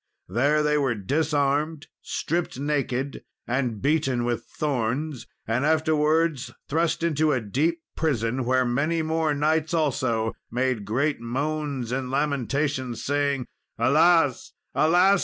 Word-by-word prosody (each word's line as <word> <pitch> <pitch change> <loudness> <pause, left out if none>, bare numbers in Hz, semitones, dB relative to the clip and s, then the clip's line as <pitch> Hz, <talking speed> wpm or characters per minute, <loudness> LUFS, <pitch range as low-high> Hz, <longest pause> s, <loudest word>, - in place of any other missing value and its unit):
There 145 +5 +2
they 150 0 +2
were 130 -4 +1
disarmed, 145 - 0 0.2
stripped 170 -5 -2
naked, 140 -2 -2 0.2
and 120 -3 -2
beaten 140 -5 +1
with 120 -1 -2
thorns, 140 0 -2 0.2
and 115 +4 0
afterwards 155 -1 +2 0.2
thrust 165 +2 0
into 155 -2 +2
a 130 - +2
deep 155 +10 -1
prison, 130 -5 0
where 130 +1 +2
many 150 +7 0
more 160 -1 0
knights, 155 +3 +1
also, 125 -7 0 0.2
made 125 -3 -1
great 140 +7 0
moans 140 0 -2
and 130 0 -2
lamentations, 140 -2 -1
saying, 140 -2 0 0.3
"Alas, 155 -1 +3 0.2
alas! 180 +5 +4
145 Hz, 120 wpm, -25 LUFS, 125-155 Hz, 0.3 s, alas